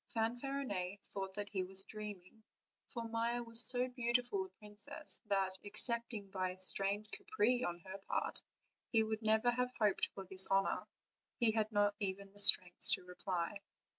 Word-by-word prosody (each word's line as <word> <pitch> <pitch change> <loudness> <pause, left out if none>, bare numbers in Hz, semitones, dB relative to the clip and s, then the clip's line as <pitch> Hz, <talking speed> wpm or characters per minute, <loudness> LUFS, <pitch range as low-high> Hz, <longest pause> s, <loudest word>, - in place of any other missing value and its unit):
Eanfarinet 225 -5 -3
thought 195 -1 -7
that 205 0 -5
he 195 -2 -2
was 190 +1 +4
dreaming, 210 -1 -10 0.5
for 235 -2 -6
Maia 230 +1 -2
was 230 0 +3
so 250 +2 +5
beautiful 245 +8 -1
a - - -14
princess 210 -1 -2
that, 190 -2 -1
excepting 225 0 -1
by 185 -1 -2
a 180 - -9
strange 200 +3 +3
caprice 415 - -1
on 175 0 -3
her 190 +2 -9
part, - - -2 0.5
he 225 -2 +3
could 220 0 -4
never 220 +2 +2
have 250 +1 -1
hoped 210 -3 +1
for 195 - -8
this 190 +1 +4
honor; 195 0 0 0.5
he 235 -3 +3
had 215 0 -1
not 205 -1 +1
even 195 0 -4
the 205 - -13
strength 180 -3 +6
to - - +2
reply. 180 +1 -4
210 Hz, 165 wpm, -35 LUFS, 195-235 Hz, 0.5 s, strength